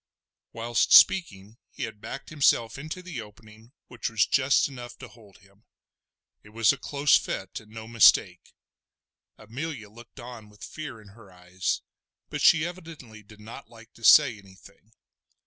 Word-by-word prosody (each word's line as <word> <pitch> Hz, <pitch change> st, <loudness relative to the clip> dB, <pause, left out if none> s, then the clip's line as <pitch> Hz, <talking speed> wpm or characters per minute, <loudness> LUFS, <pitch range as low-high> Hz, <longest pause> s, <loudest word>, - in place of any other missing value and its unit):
Whilst 115 Hz, 0 st, -1 dB
speaking 110 Hz, -, +4 dB
he 135 Hz, -, -8 dB
had 110 Hz, -2 st, -7 dB
backed 135 Hz, -, -9 dB
himself 135 Hz, -5 st, +1 dB
into 155 Hz, +5 st, -8 dB
the 170 Hz, -10 st, -7 dB
opening 110 Hz, +2 st, -17 dB
which 125 Hz, 0 st, -6 dB
was 115 Hz, -1 st, +1 dB
just 130 Hz, 0 st, +2 dB
enough 120 Hz, -3 st, -11 dB
to 130 Hz, -, -11 dB
hold 105 Hz, -3 st, -19 dB
him. 100 Hz, +1 st, -26 dB, 0.8 s
It 105 Hz, -, -18 dB
was 115 Hz, +3 st, +2 dB
a -, -, -8 dB
close 145 Hz, 0 st, +2 dB
fit 95 Hz, -1 st, -3 dB
and 110 Hz, -, -19 dB
no 110 Hz, 0 st, -10 dB
mistake. 100 Hz, -5 st, +3 dB, 0.8 s
Amelia 115 Hz, 0 st, -8 dB
looked 120 Hz, +4 st, -16 dB
on 120 Hz, -3 st, -11 dB
with 105 Hz, 0 st, -17 dB
fear 140 Hz, -7 st, -8 dB
in 105 Hz, -2 st, -17 dB
her 100 Hz, -1 st, -18 dB
eyes, 90 Hz, +1 st, -4 dB, 0.5 s
but -, -, -5 dB
she 165 Hz, 0 st, +4 dB
evidently 160 Hz, -11 st, -10 dB
did 105 Hz, 0 st, -18 dB
not 115 Hz, +5 st, -12 dB
like 115 Hz, 0 st, -17 dB
to 115 Hz, -, -19 dB
say 125 Hz, -1 st, +6 dB
anything. 100 Hz, +2 st, -20 dB
115 Hz, 160 wpm, -26 LUFS, 105-135 Hz, 0.8 s, say